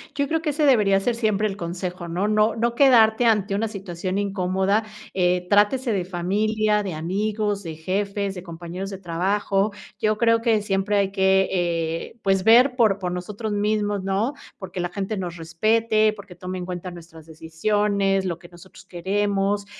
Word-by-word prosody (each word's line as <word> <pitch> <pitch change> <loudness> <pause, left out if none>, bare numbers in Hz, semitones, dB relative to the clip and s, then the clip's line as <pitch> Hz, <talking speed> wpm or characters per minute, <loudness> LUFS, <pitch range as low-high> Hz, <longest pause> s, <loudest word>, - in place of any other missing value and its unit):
Yo 280 0 0
creo 320 +1 0
que 320 - -1
ese 300 +1 +1
debería 210 -8 +4
ser 235 +4 -1
siempre 215 -2 +1
el 195 - -4
consejo, 175 0 -5
¿no? 180 +5 -1
No 215 +1 +2
no 235 +1 0
quedarte 240 -4 +5
ante 210 -3 +2
una 220 +3 0
situación 190 -3 -5
incómoda, 195 +1 0 0.3
eh, 180 -1 +1
trátese 210 +5 +3
de 185 -3 -1
familia, 210 +4 0
de 190 -3 -4
amigos, 205 +5 -2
de 165 -3 -6
jefes, 200 +4 -2
de 180 - -7
compañeros 175 +2 -7
de 195 - -6
trabajo. 195 +3 0 0.3
Yo 215 0 +1
creo 230 +1 +3
que 225 -2 +2
siempre 200 0 0
hay 195 -1 +1
que, 190 -1 +3
eh, 170 +1 -2
pues 195 -1 +2
ver 245 +5 +6
por 215 -5 +3
por 180 -2 -3
nosotros 205 +5 -5
mismos, 205 -1 0
¿no?, 195 +7 0 0.2
porque 185 -2 -7
la 175 0 -1
gente 200 +3 -4
nos 175 -2 -5
respete, 215 +6 +2
porque 195 -3 -12
tome 185 +1 -6
en 180 - -5
cuenta 180 0 -5
nuestras 165 -2 -13
decisiones, 195 +5 0
lo 175 -3 -2
que 175 - -14
nosotros 175 +2 -16
queremos. 200 +2 -1
195 Hz, 175 wpm, -23 LUFS, 180-215 Hz, 0.3 s, ver